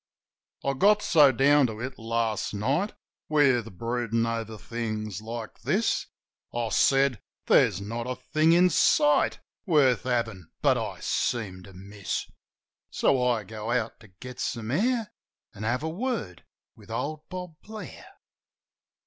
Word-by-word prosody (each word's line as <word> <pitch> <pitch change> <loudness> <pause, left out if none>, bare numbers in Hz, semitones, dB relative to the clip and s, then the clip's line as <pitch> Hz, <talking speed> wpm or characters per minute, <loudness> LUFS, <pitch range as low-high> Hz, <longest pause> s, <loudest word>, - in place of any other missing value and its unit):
I 140 - +1
get 205 +8 +4
so 150 -5 +6
down 140 +2 +4
to 110 -2 -7
it 130 +2 -6
last 115 -2 -1
night. 140 - 0 0.4
With 125 - +2
broodin' 115 0 -1
over 115 -1 -3
things 110 -3 -4
like 115 0 -7
this, - - 0 0.4
I 120 -1 -2
said 135 +2 +3 0.2
"There's 85 - +4
not 115 +4 -4
a 125 - -2
thing 155 +6 +2
in 180 +1 +5
sight 150 -1 +3 0.3
Worth 140 -8 +4
havin' 115 -8 -2
but - - +5
I - - -4
seem 100 -6 -1
to 95 - -14
miss." 100 +2 -5 0.6
So 130 -2 +2
I 120 -3 +1
go 110 +2 -7
out 120 -2 -1
to 110 - -16
get 120 +7 -11
some 115 -1 -3
air 225 - 0 0.4
An' 105 - -11
have 120 +5 -1
a 160 - -1
word 205 - -4 0.3
with 105 -1 -17
old 150 +7 -4
Bob 180 -2 -6
Blair. 220 - -9
120 Hz, 140 wpm, -27 LUFS, 110-145 Hz, 0.6 s, so